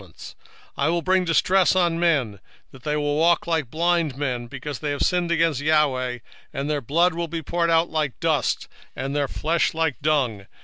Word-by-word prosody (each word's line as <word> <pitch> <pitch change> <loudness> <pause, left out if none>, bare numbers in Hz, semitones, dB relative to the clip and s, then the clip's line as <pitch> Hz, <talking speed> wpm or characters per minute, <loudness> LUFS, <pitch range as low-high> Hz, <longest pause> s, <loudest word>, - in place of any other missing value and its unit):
1:17 95 - -14
And 80 - -23 0.6
I 140 - +1
will 170 0 0
bring 185 0 +2
distress 180 +2 +3
upon 175 -3 +1
men, 140 - +1 0.3
that 135 - -15
they 150 +3 -2
shall 150 - 0 0.2
walk 170 +2 +3
like 160 -7 -1
blind 165 -2 0
men, 125 -4 -3
because 145 +3 -6
they 150 - -3
have 145 -1 -1
sinned 180 -2 +1
against 165 -4 +1
the 145 +2 -2
LORD: 130 -5 +1 0.3
and 140 +1 -4
their 150 -1 -1
blood 170 +8 +2
shall 170 +1 -3
be 165 0 -5
poured 170 +2 0
out 165 0 +2
as 155 -2 +1
dust, 160 -4 0 0.3
and 135 +1 -4
their 145 -1 +1
flesh 165 +5 0
as - - -6
the 160 -4 +1
dung. 130 -10 0
155 Hz, 210 wpm, -23 LUFS, 140-170 Hz, 0.6 s, distress